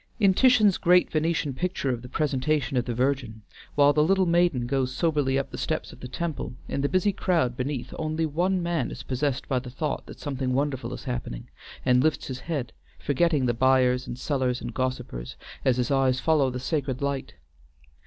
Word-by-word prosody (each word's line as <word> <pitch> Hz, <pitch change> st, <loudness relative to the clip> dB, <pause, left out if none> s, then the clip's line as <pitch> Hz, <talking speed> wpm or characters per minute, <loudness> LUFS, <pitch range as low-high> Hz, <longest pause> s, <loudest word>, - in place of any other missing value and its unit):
In 200 Hz, -3 st, +5 dB
Titian's 220 Hz, -4 st, +5 dB
great 180 Hz, +1 st, +4 dB
Venetian 155 Hz, -2 st, 0 dB
picture 170 Hz, -3 st, -1 dB
of 120 Hz, -2 st, -3 dB
the 125 Hz, -, -10 dB
Presentation 145 Hz, 0 st, 0 dB
of 125 Hz, -1 st, +1 dB
the 120 Hz, -, -3 dB
Virgin, 125 Hz, -4 st, -1 dB, 0.3 s
while 145 Hz, 0 st, +5 dB
the 150 Hz, -, +4 dB
little 190 Hz, +3 st, +3 dB
maiden 170 Hz, -7 st, +2 dB
goes 130 Hz, 0 st, 0 dB
soberly 145 Hz, -3 st, +1 dB
up 135 Hz, -, -2 dB
the -, -, -6 dB
steps -, -, -2 dB
of -, -, -14 dB
the 125 Hz, -, -7 dB
temple, 155 Hz, -1 st, -4 dB
in 140 Hz, -, -2 dB
the 140 Hz, -, +1 dB
busy 185 Hz, +2 st, +2 dB
crowd 165 Hz, -11 st, +1 dB
beneath 130 Hz, 0 st, -3 dB
only 155 Hz, +1 st, -1 dB
one 175 Hz, +4 st, 0 dB
man 170 Hz, -6 st, -1 dB
is -, -, -7 dB
possessed 135 Hz, +1 st, -2 dB
by 130 Hz, -3 st, +1 dB
the 125 Hz, 0 st, -9 dB
thought 145 Hz, +4 st, -3 dB
that -, -, -11 dB
something 130 Hz, -3 st, -2 dB
wonderful 130 Hz, -3 st, -1 dB
is 130 Hz, -, -7 dB
happening, 120 Hz, -, -5 dB, 0.3 s
and 125 Hz, -1 st, +4 dB
lifts 155 Hz, -1 st, +1 dB
his 130 Hz, -1 st, -5 dB
head, 145 Hz, -5 st, -4 dB, 0.2 s
forgetting 145 Hz, -, +1 dB
the 120 Hz, -, +2 dB
buyers 130 Hz, +1 st, +3 dB
and 120 Hz, -, -5 dB
sellers 130 Hz, -2 st, -1 dB
and -, -, -6 dB
gossipers, 125 Hz, -, -3 dB, 0.3 s
as 130 Hz, -2 st, +3 dB
his 125 Hz, +1 st, 0 dB
eyes 135 Hz, -2 st, +2 dB
follow 150 Hz, -4 st, +3 dB
the 125 Hz, 0 st, -4 dB
sacred 135 Hz, -2 st, -2 dB
sight. 140 Hz, -1 st, -3 dB
135 Hz, 195 wpm, -26 LUFS, 125-155 Hz, 0.3 s, In